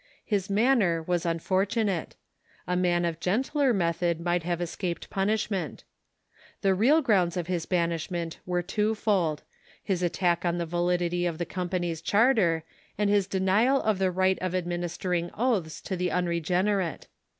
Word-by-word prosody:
His 200 -3 -1
manner 200 -6 +2
was 175 +1 -1
unfortunate. 190 +3 0 0.5
A 180 - -1
man 175 -1 +2
of 165 -2 -2
gentler 265 - +1
method 170 -4 0
might 175 +1 0
have 175 +1 -2
escaped 175 0 -4
punishment. 195 -4 -1 0.8
The 195 -1 +4
real 270 +12 +4
grounds 185 -8 +2
of 175 - -2
his 175 -2 -2
banishment 170 -1 -2
were 180 -1 0
twofold: 200 -5 0 0.4
his 190 -3 -1
attack 175 0 +1
on 175 -1 0
the 170 - -1
validity 175 +1 0
of 165 -2 -3
the 175 - -2
company's 175 -3 -3
charter, 200 -6 +3 0.3
and 205 0 +2
his 200 -2 +2
denial 200 +8 +2
of 215 -5 0
the 190 -1 +2
right 185 +1 +1
of 185 0 -2
administering 175 0 -2
oaths 205 - 0
to 190 - -4
the 180 0 -1
unregeneiMte. 180 +1 0
180 Hz, 145 wpm, -27 LUFS, 170-200 Hz, 0.8 s, The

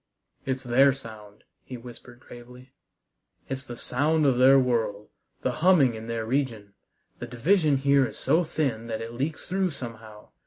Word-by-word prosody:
"It's 130 0 -2
their 130 +3 +4
sound," 110 -5 -12 0.2
he 125 - -8
whispered 120 0 -13
gravely. 125 +1 -14 0.8
"It's 135 0 -4
the 120 -3 -9
sound 150 +6 +1
of 130 -3 +2
their 135 +2 +7
world, 115 -5 0 0.3
the - - +1
humming 160 -9 +5
in 110 0 -8
their 115 -1 -3
region. 115 -5 -2 0.5
The 120 - -6
division 150 - +2
here 140 -1 +3
is - - -11
so 170 +3 +2
thin 130 -8 -2
that 110 -1 -4
it 115 +1 -7
leaks 140 +6 -4
through 190 0 0
somehow. 115 -7 -10
125 Hz, 160 wpm, -26 LUFS, 115-140 Hz, 0.8 s, their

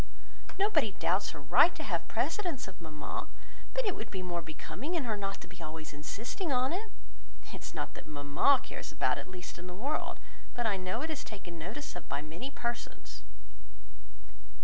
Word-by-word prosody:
Nobody 320 - +4
doubts 185 +2 +3
her 160 - -5
right 155 - +7
to - - -3
have - - 0
precedence 350 - +1
of 190 -2 -10
mamma, 155 -2 -3 0.5
but - - +3
it 395 - +2
would 220 - -4
be 190 -2 -2
more 175 -1 0
becoming 255 - -3
in 325 - +2
her 225 -4 +1
not 195 -1 -2
to - - -8
be 180 0 -11
always 155 -1 -5
insisting 225 - -2
on 255 +3 +4
it. 425 +5 -1 0.6
It - - -6
is - - -6
not - - -2
that - - -9
mamma 145 - +5
cares - - -5
about - - +3
it - - -5
the - - -14
least 180 -2 -6
in 180 - -6
the 180 - -5
world, 275 +10 0 0.4
but 240 - +1
I 210 -3 +4
know 185 +5 -1
it 320 - 0
is 300 - -2
taken 175 -5 -7
notice 210 - -4
of 175 - -7
by 140 +1 0
many 165 - -4
persons." 235 -3 -3
195 Hz, 195 wpm, -34 LUFS, 170-280 Hz, 0.6 s, right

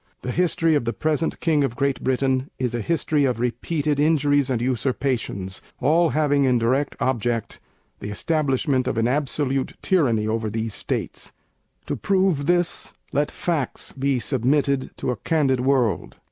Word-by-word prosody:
The 125 - -2
history 165 0 +2
of 145 -6 +1
the 115 - -1
present 155 +1 -1
King 155 -3 +2
of 125 -4 -1
Great 140 -1 -1
Britain 130 +1 +1
is 125 -2 -1
a 120 - -1
history 155 0 +1
of 125 -3 0
repeated 145 +5 -1
injuries 145 -2 +3
and 125 -3 0
usurpations, 120 -6 -1 0.2
all 165 +5 +3
having 145 -2 +2
in 125 -2 +3
direct 130 +5 +1
object 120 -3 -1 0.4
the 100 - -6
establishment 135 +1 0
of - - -1
an 115 +1 +2
absolute 135 0 -1
Tyranny 120 - +2
over 110 0 -1
these 110 0 -3
States. - - -4 0.5
To - - -2
prove 185 -7 +1
this, 175 0 +1 0.2
let 145 +2 +1
Facts 160 -7 -2
be 135 0 0
submitted 135 +2 +1
to - - -1
a 125 - -3
candid 135 +1 +1
world. 130 -4 +1
135 Hz, 155 wpm, -23 LUFS, 120-150 Hz, 0.5 s, injuries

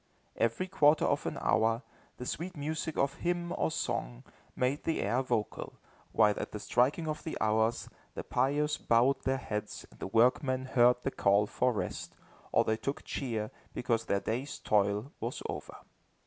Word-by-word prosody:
Every 115 +11 0
quarter 155 -5 +4
of - - 0
an - - -3
hour, 115 +2 +2 0.3
the 125 - -6
sweet 175 +6 -4
music 155 +2 -3
of 140 0 +1
hymn 175 0 -1
or - - +1
song, - - -3 0.3
made 130 +4 0
the 165 - 0
air 120 +6 +1
vocal, 120 -5 -2 0.3
while 105 -2 +5
at - - -4
the 105 - -4
striking 140 +10 +1
of 155 0 -3
the 160 - -4
hours, 110 +2 +1 0.3
the - - -4
pious 145 +4 +1
bowed 130 +4 +3
their 135 0 +2
heads 105 -5 -5
and - - -19
the - - -4
workmen 130 +5 +3
heard 125 -1 +4
the 135 - -1
call 100 -2 +3
for 125 +4 +1
rest, 110 - -4 0.4
or - - +4
they 110 - 0
took 140 +5 -4
cheer, 110 -6 -3 0.2
because 115 -2 0
their 100 - +1
day's 130 +6 -3
toil 105 +5 +1
was - - -4
over. - - -6
125 Hz, 170 wpm, -31 LUFS, 110-145 Hz, 0.4 s, while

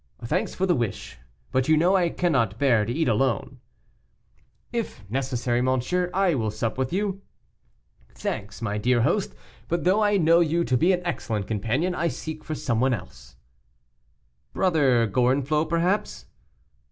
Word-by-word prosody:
"Thanks 180 - -1
for 190 - 0
the 180 - +3
wish, 115 - -4 0.3
but 130 0 +1
you 155 0 +4
know 175 +5 +3
I 175 -3 +3
cannot 130 - 0
bear 120 -6 +3
to 115 - -3
eat 160 +4 0
alone." 120 0 0 1.1
"If 225 - -4
necessary, 125 -2 -1
monsieur, 130 +8 0
I 190 -2 +2
will 115 -6 -1
sup 110 +2 -3
with 130 0 -2
you." 195 +1 -2 0.9
"Thanks, 105 +3 -5
my 105 -1 -2
dear 120 +2 +2
host, 180 - 0 0.3
but 170 0 -1
though 190 +4 +3
I 205 -1 +3
know 165 -1 +4
you 170 0 +2
to 130 - 0
be 170 +9 +3
an 180 -1 -1
excellent 110 - -2
companion, 115 - -1
I 170 -1 0
seek 155 -1 -6
for 155 - -4
some 115 -6 -1
one 130 -1 +3
else." 90 - -12 1.2
"Brother 140 -10 +3
Gorenflot, 135 +7 +1
perhaps?" 175 +5 0
140 Hz, 155 wpm, -25 LUFS, 120-175 Hz, 1.2 s, you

